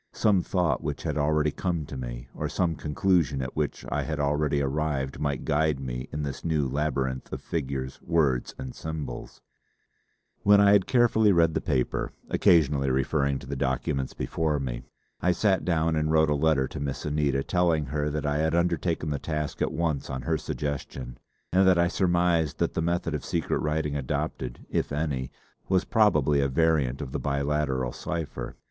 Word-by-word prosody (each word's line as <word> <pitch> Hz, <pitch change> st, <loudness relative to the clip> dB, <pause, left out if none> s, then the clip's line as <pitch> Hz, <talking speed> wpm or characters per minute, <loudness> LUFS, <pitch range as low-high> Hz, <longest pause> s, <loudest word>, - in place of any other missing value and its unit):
Some 100 Hz, -4 st, +3 dB
thought 85 Hz, -7 st, 0 dB
which -, -, -4 dB
had -, -, -2 dB
already 75 Hz, 0 st, +2 dB
come 85 Hz, -3 st, -2 dB
to 70 Hz, -, -8 dB
me, -, -, -6 dB
or -, -, -3 dB
some 85 Hz, -3 st, 0 dB
conclusion 75 Hz, -1 st, +1 dB
at 65 Hz, 0 st, -4 dB
which 75 Hz, -2 st, -2 dB
I -, -, +1 dB
had 80 Hz, -1 st, -3 dB
already 75 Hz, 0 st, +1 dB
arrived 70 Hz, -1 st, -1 dB
might 70 Hz, -3 st, -2 dB
guide 75 Hz, -1 st, +1 dB
me 65 Hz, -1 st, -5 dB
in 75 Hz, 0 st, -3 dB
this 70 Hz, -2 st, -5 dB
new 75 Hz, -4 st, +1 dB
labyrinth 65 Hz, -2 st, -2 dB
of -, -, -4 dB
figures, 65 Hz, -4 st, -4 dB
words 75 Hz, -7 st, +1 dB
and 65 Hz, -1 st, -6 dB
symbols. 75 Hz, -6 st, -6 dB
See -, -, -23 dB, 1.0 s
Appendix -, -, -9 dB
A. -, -, +3 dB
When 100 Hz, 0 st, +8 dB
I 100 Hz, 0 st, +6 dB
had 100 Hz, -2 st, +4 dB
carefully 115 Hz, -4 st, +4 dB
read 85 Hz, -3 st, +4 dB
the -, -, 0 dB
paper, 65 Hz, -1 st, -1 dB, 0.2 s
occasionally 70 Hz, -5 st, +4 dB
referring 70 Hz, +2 st, +1 dB
to 70 Hz, -, -10 dB
the 70 Hz, +2 st, -4 dB
documents 65 Hz, 0 st, -1 dB
before 80 Hz, -3 st, -1 dB
me, -, -, -4 dB, 0.4 s
I 90 Hz, -, +3 dB
sat 95 Hz, 0 st, +2 dB
down 80 Hz, -2 st, +1 dB
and 75 Hz, 0 st, +1 dB
wrote 80 Hz, -1 st, +4 dB
a -, -, +3 dB
letter 70 Hz, -3 st, +2 dB
to -, -, -6 dB
Miss 70 Hz, -1 st, -4 dB
Anita 75 Hz, -2 st, +1 dB
telling 85 Hz, -4 st, +1 dB
her 75 Hz, +2 st, -1 dB
that 75 Hz, 0 st, -3 dB
I 75 Hz, 0 st, +1 dB
had 80 Hz, +1 st, +1 dB
undertaken 85 Hz, -2 st, 0 dB
the 70 Hz, -, -1 dB
task 75 Hz, -2 st, -3 dB
at -, -, +1 dB
once 80 Hz, -3 st, -1 dB
on 65 Hz, -1 st, -4 dB
her 80 Hz, -2 st, 0 dB
suggestion 65 Hz, -4 st, -5 dB, 0.3 s
and 95 Hz, +1 st, +5 dB
that 95 Hz, -2 st, +5 dB
I 85 Hz, 0 st, +4 dB
surmised 85 Hz, -4 st, +1 dB
that -, -, 0 dB
the -, -, -1 dB
method 85 Hz, -1 st, -1 dB
of 75 Hz, -, -3 dB
secret 85 Hz, -2 st, -1 dB
writing 75 Hz, -1 st, -1 dB
adopted 65 Hz, -2 st, -3 dB
if -, -, -1 dB
any, 70 Hz, -4 st, -2 dB, 0.4 s
was 95 Hz, -1 st, +2 dB
probably 75 Hz, -, +3 dB
a 70 Hz, -, +2 dB
variant 75 Hz, -2 st, +1 dB
of 70 Hz, -3 st, -5 dB
the -, -, -2 dB
Biliteral 70 Hz, -3 st, -1 dB
cipher. 85 Hz, -4 st, -5 dB
75 Hz, 190 wpm, -27 LUFS, 70-80 Hz, 1.0 s, When